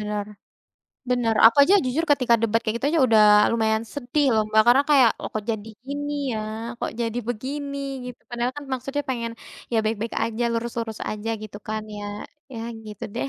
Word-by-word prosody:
benar, 210 -1 -3 0.8
benar. 235 -3 +2
Aku 230 - +5
aja 390 - +4
jujur 280 +7 0
ketika 250 -4 +3
debat 230 0 +2
kayak 220 +1 -1
gitu 265 - -2
aja 330 - +3
udah 220 -1 +6 0.3
lumayan 220 0 +1
sedih, 285 +1 0
loh, 215 - +3
Mbak, 220 0 +6
karena 265 +3 +6
kayak, 260 -6 +6
loh, - - -4
kok 215 -1 -3
jadi 220 0 -4 0.2
gini, 290 +1 -3 0.2
ya, 220 - -2 0.4
kok - - -3
jadi 230 0 -1
begini, 280 +4 -4 0.4
gitu, - - -29
padahal 240 +1 -2
kan 290 - -6
maksudnya 275 +3 -2
pengen, 235 -2 -3 0.4
ya, 225 - +3
baik-baik 220 +1 -2
aja, 230 +1 -3
lurus-lurus 230 -1 -3
aja, 215 +1 -4
gitu 210 -1 -8
kan, 215 0 -2
ya. 205 - -6 0.5
Ya, 225 - -6 0.3
gitu 210 -1 -7
deh. 260 - -2
230 Hz, 185 wpm, -24 LUFS, 220-260 Hz, 0.8 s, udah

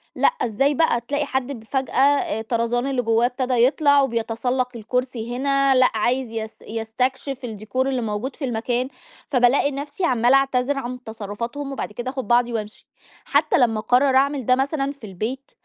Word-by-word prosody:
لأ - - +3
إزاي 275 - +1
بقى؟! 300 -7 +2
تلاقي 285 +4 -2
حد 265 0 -2
بفجأة 265 +4 -3
آآ 280 -6 +2
طرزان 235 +3 -1
اللي 265 -2 0
جواه 230 +1 +2
ابتدى 255 +1 -1
يطلع 285 0 +4
وبيتسلق 245 +1 -1
الكرسي 240 +1 -3
هنا، 275 0 +2
لأ 255 0 +5
عايز 240 +2 0
يس 220 -1 -4
يستكشف 250 +4 -3
الdécor 220 +2 -8
اللي 260 -2 -1
موجود 225 +5 -3
في 285 - -4
المكان، 245 +1 -1 0.4
فبالاقي 265 +2 +3
نفْسِي 290 +6 -3
عمالة 245 +1 +3
أعتذر 275 0 +1
عن 250 -1 -5
تصرفاتهم 235 +6 -5
وبعد 270 - -4
كده 240 +3 -4
آخد 260 -2 -5
بعضي 240 0 +3
وأمشي. 215 -1 -6 0.4
حتى 290 +2 +2
لمّا 225 -5 +2
أقرر 260 +4 +3
أعمل 275 -2 +2
ده- 255 - +4
مثلًا 275 +1 -1
في 280 -4 -16
البيت 230 +9 -5
255 Hz, 165 wpm, -22 LUFS, 230-275 Hz, 0.4 s, لأ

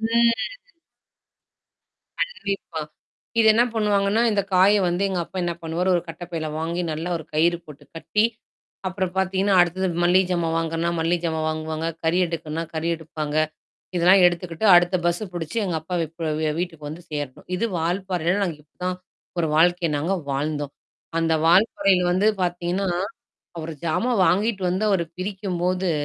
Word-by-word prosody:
ம் 230 +1 +3 1.9
கண்டிப்பா. 200 - -3 0.6
இது 220 - +5
என்ன 230 - +4
பண்ணுவாங்கன்னா, 210 0 +2
இந்த 200 -1 +2
காய 190 +3 +6
வந்து 175 +3 0
எங்க 185 -2 -1
அப்பா 190 - -8
என்ன 175 - 0
பண்ணுவாரு 165 +3 -1
ஒரு 170 - -1
கட்டைப்பையில 165 -1 -5
வாங்கி 170 +2 -2
நல்லா 160 +3 -4
ஒரு 160 - -7
கயிறு 170 +3 +3
போட்டு 150 -2 -13
கட்டி, 210 +6 +1 0.6
அப்புறம் 185 -1 -2
பார்த்தீங்கன்னா, 190 +1 +2
அடுத்தது 180 +2 +1 0.2
மல்லிகை 185 +2 +4
ஜாமா 170 -2 +1
வாங்குனா, 165 +1 0
மல்லிகை 165 +1 +1
ஜாமா 160 -1 -1
வாங்குவாங்க, 155 0 -3 0.2
கறி 165 +2 +2
எடுக்கனா, 165 -1 -4
கறி 160 +1 -1
எடுப்பாங்க. 155 -2 -5 0.6
இதெல்லாம் 180 +2 +6
எடுத்துக்கிட்டு 175 +2 0
அடுத்த 175 +1 +4
பஸ்ஸ 175 +4 +1
புடிச்சு 165 +4 -4
எங்க 180 -3 -1
அப்பாவ 175 +2 -2 0.2
ப் - - -10 0.2
வ - - +2
வீட்டுக்கு 165 -4 -4
வந்து 160 +4 -8
சேரணும். 145 -3 -5
இது 225 - 0
வால்பறைல 175 0 0
நாங்க 170 -6 -2
இப்பதான். 180 +4 -5 0.4
ஒரு 165 -2 +1
வாழ்க்கைய 175 +1 +3
நாங்க 165 +7 0 0.2
வாழ்ந்தோம். 145 0 -2 0.5
அந்த 165 0 +2
வால்பாறையில 185 +1 +4
வந்து 190 +4 +3 0.2
பார்த்தீங்கன்னா, 175 +2 -1 0.7
அவரு 160 0 -5
ஜாமா 170 +10 +1
வாங்கிட்டு 195 +4 +1
வந்து 190 +4 0
அவரு 190 -4 +2
பிரிக்கும்போது, 185 -1 -1
175 Hz, 145 wpm, -23 LUFS, 165-190 Hz, 1.9 s, காய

